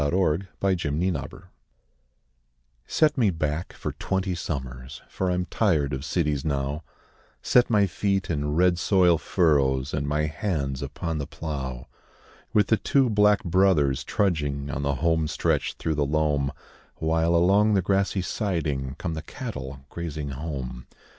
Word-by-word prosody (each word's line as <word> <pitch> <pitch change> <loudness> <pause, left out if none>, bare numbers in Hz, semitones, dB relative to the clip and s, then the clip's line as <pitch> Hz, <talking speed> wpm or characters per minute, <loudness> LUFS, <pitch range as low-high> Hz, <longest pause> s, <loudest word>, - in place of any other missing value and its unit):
THE 75 - +2
SHAKEDOWN 90 +1 +1 0.6
ON 95 - +2
THE - - -2
FLOOR - - -15 1.4
Set 150 -3 +2
me 110 -5 +4
back 80 -1 -2
for - - -4
twenty 95 -1 -2
summers 65 -6 -5
For 95 - -2
I'm 90 0 0
tired 80 -7 +1
of 65 +1 -3
cities 75 -4 0
now 70 0 -1 0.6
Set 125 0 +4
my 105 -3 +4
feet 100 +1 -1
in 75 -2 -1
red 90 0 +3
soil 90 -5 +4
furrows 70 -6 +2
And 70 -2 -1
my 75 +1 +1
hands 75 -5 -2
upon 75 +3 -3
the 70 - -4
plough, 65 -6 -5 0.7
With 105 -2 +3
the 110 - +4
two 135 0 +2
'Black 105 -1 +4
Brothers' 80 -7 +3
trudging 75 -8 -1
On 70 - -3
the 70 -1 0
home 80 +1 +1
stretch - - 0
through 80 - -2
the 75 -1 0
loam 75 -2 +1 0.4
While, 80 +1 +1
along 100 +5 +4
the 95 - +2
grassy 95 0 +1
siding, 80 - -2
Come 85 -3 -3
the 80 - -4
cattle 70 - -7
grazing 75 -4 -4
home. 65 -4 -5
80 Hz, 150 wpm, -25 LUFS, 70-95 Hz, 1.4 s, me